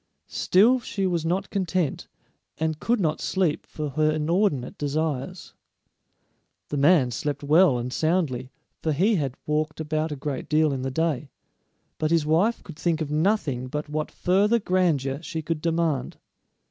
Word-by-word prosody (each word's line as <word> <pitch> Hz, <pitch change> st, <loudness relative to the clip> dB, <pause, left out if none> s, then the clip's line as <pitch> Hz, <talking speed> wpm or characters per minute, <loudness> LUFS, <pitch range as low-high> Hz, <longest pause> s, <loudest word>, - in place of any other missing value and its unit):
Still 230 Hz, +8 st, +3 dB
she 200 Hz, -4 st, -3 dB
was 170 Hz, -3 st, 0 dB
not 190 Hz, +4 st, -1 dB
content, 185 Hz, -6 st, -1 dB, 0.5 s
and 160 Hz, -1 st, -1 dB
could 235 Hz, +6 st, +1 dB
not 155 Hz, -5 st, 0 dB
sleep 175 Hz, -5 st, 0 dB
for 150 Hz, -1 st, -4 dB
her 155 Hz, +3 st, +2 dB
inordinate 155 Hz, -3 st, 0 dB
desires. 150 Hz, +3 st, -3 dB, 1.2 s
The 145 Hz, -, -2 dB
man 140 Hz, -3 st, +4 dB
slept 145 Hz, +4 st, -3 dB
well 150 Hz, -1 st, +5 dB
and 125 Hz, +1 st, -4 dB
soundly, 155 Hz, -7 st, 0 dB, 0.3 s
for 155 Hz, -, 0 dB
he 195 Hz, +10 st, +3 dB
had 135 Hz, -5 st, -2 dB
walked 150 Hz, +1 st, -1 dB
about 155 Hz, 0 st, -1 dB
a -, -, -2 dB
great 140 Hz, -1 st, -5 dB
deal 155 Hz, -1 st, +3 dB
in 130 Hz, -, -3 dB
the 135 Hz, -, -2 dB
day; 150 Hz, -1 st, -1 dB, 0.7 s
but 155 Hz, -, +1 dB
his 165 Hz, -2 st, +2 dB
wife 175 Hz, +10 st, +2 dB
could 160 Hz, -3 st, -11 dB
think 170 Hz, -2 st, 0 dB
of 155 Hz, -2 st, -3 dB
nothing 150 Hz, -, 0 dB
but 150 Hz, +3 st, -4 dB
what 155 Hz, 0 st, -2 dB
further 200 Hz, +5 st, +2 dB
grandeur 165 Hz, -, 0 dB
she 160 Hz, -1 st, -5 dB
could 155 Hz, 0 st, -3 dB
demand. 165 Hz, -5 st, -1 dB
155 Hz, 160 wpm, -25 LUFS, 145-180 Hz, 1.2 s, well